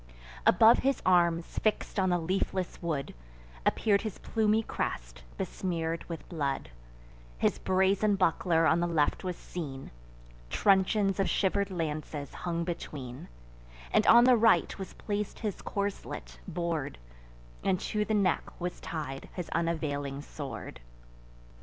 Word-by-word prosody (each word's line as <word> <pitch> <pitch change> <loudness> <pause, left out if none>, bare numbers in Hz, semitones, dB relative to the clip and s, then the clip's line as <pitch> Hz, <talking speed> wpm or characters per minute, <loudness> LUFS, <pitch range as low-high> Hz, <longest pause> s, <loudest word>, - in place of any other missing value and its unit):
Above 220 +6 +7
his 275 0 +1
arms, 170 -2 +3
fix'd 215 -1 0
on 185 -1 +3
the 175 - +3
leafless 185 +1 -2
wood, 155 -6 -2 0.5
Appear'd 200 -2 +3
his 215 -4 -5
plumy 220 0 +1
crest, - - -4 0.2
besmear'd 165 -3 -2
with 165 -2 -7
blood: 140 - -2 0.7
His - - +1
brazen 190 +2 +2
buckler 165 -2 +2
on 160 +2 +4
the 175 - +1
left 155 -4 +1
was 180 -1 -2
seen; 140 -8 -7 0.6
Truncheons 195 - +3
of 195 - +2
shiver'd 200 +1 +1
lances 155 -5 -4
hung 170 -1 -2
between; 140 -7 -6 0.7
And - - +4
on 235 +1 +9
the 250 0 +7
right 225 0 +4
was 190 - -6
placed 210 -1 -3
his 210 -4 -4
corslet, 190 - -4
bor'd; 165 - -2 0.7
And 185 - +2
to 210 0 0
the 215 0 0
neck 200 -3 0
was 180 0 -4
tied 145 -5 -5
his 180 -3 -4
unavailing 145 -4 -2
sword. 145 - -7
175 Hz, 130 wpm, -30 LUFS, 155-200 Hz, 0.7 s, on